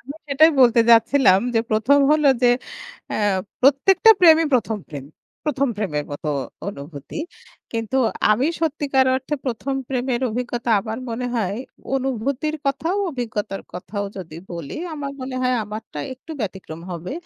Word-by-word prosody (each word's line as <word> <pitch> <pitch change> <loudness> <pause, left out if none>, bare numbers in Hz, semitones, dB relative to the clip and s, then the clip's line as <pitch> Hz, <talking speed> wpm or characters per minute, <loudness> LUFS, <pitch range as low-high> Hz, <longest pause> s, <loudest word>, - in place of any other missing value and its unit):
আমি 280 +3 -9
সেটাই 310 +4 +6
বলতে 240 -1 +6
যাচ্ছিলাম। 230 -4 +5
যে 225 - +4
প্রথম 225 +7 +4
হল 305 -1 +3 0.2
যে, 245 - +6 0.6
এ - - -1 0.4
প্রত্যেকটা 290 - +5
প্রেমই 325 -2 +7
প্রথম 220 -2 0
প্রেম। 140 -3 -8 0.4
প্রথম 280 -2 0
প্রেমের 150 -9 -2
মত 145 - -8 0.4
অনুভূতি। 145 - -8 0.5
কিন্তু 230 +2 -2 0.3
আমি 245 +6 +3
সত্যিকার 285 -4 +1
অর্থে 265 +3 -2
প্রথম 260 +2 -2
প্রেমের 250 -1 -1
অভিজ্ঞতা 240 0 -3
আমার 220 +2 -5
মনে 245 +2 -3
হয়। 205 -2 -1 0.4
অনুভূতির 270 +4 -2
কথাও 325 +7 0
অভিজ্ঞতার 215 -6 -4
কথাও 200 +3 -5
যদি 165 -4 -8 0.2
বলি, 165 -5 -6 0.2
আমার 280 -2 -5
মনে 255 0 -5
হয় 255 0 +2
আমারটা 210 -6 -8 0.2
একটু 265 +5 -16
ব্যতিক্রম 185 -6 -6
হবে। 175 +5 -5
245 Hz, 140 wpm, -22 LUFS, 205-275 Hz, 0.6 s, প্রেমই